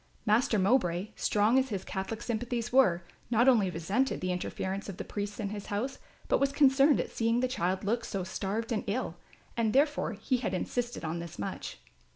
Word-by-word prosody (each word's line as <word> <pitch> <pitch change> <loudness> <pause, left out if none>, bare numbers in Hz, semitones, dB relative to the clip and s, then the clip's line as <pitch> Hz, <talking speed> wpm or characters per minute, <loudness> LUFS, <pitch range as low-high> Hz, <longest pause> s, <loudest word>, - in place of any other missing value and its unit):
Master 220 +1 +3
Mowbray, 190 -2 +2
strong 215 +5 +3
as 265 0 -1
his 195 -4 -4
Catholic 200 +4 -4
sympathies 240 0 -2
were, 185 -10 +4 0.3
not 240 +2 +3
only 220 -8 +5
resented 195 +11 0
the 185 0 -1
interference 190 +2 -3
of 190 - -7
the - - -4
priests 205 0 -5
in 205 -2 -2
his 205 -1 -6
house, 235 +7 -3 0.3
but - - +3
was 275 0 +2
concerned 280 0 +5
at - - -2
seeing 230 +1 +1
the 255 - +2
child 190 -7 -1
look 230 +4 0
so 195 -4 -3
starved 205 +5 -3
and 220 - 0
ill, 205 -5 -2 0.4
and 225 -2 +1
therefore 290 -3 +2
he 220 +5 -1
had 245 - -2
insisted 240 +2 -3
on 160 +2 -2
this 170 -1 -8
much. 100 - -5
220 Hz, 195 wpm, -30 LUFS, 190-245 Hz, 0.4 s, only